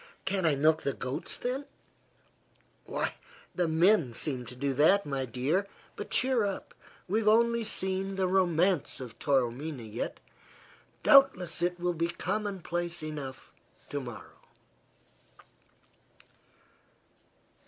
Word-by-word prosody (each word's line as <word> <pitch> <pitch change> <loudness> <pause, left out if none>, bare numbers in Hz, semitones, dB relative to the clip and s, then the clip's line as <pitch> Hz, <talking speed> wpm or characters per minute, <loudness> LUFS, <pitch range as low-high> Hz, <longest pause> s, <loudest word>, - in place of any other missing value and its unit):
"Can't 190 -3 +1
I 150 - +3
milk 155 +3 +3
the 140 - -1
goats, 130 +1 -3
then?" 260 +3 -3 1.2
"Why, - - -2 0.4
the 175 -2 0
men 160 - +3
seem 130 -5 -2
to 125 - -9
do 140 +2 -1
that, 175 +9 +4 0.3
dear. 150 - 0 0.3
But - - -7
cheer 255 -3 +3
up. 200 -1 -4 0.3
We've 215 +3 0
only 235 +1 +4
seen 190 -1 -1
the 190 -1 +1
romance 180 -4 +2
of 125 -3 -9
Taormina 135 +1 0
yet; 110 +1 -5 0.8
doubtless 225 - +5
it 175 0 0
will 175 0 0
be 170 0 0
commonplace 175 -2 -3
enough 145 -4 -7 0.4
to 145 - -2
morrow." 120 -8 -10
175 Hz, 110 wpm, -30 LUFS, 140-195 Hz, 1.2 s, doubtless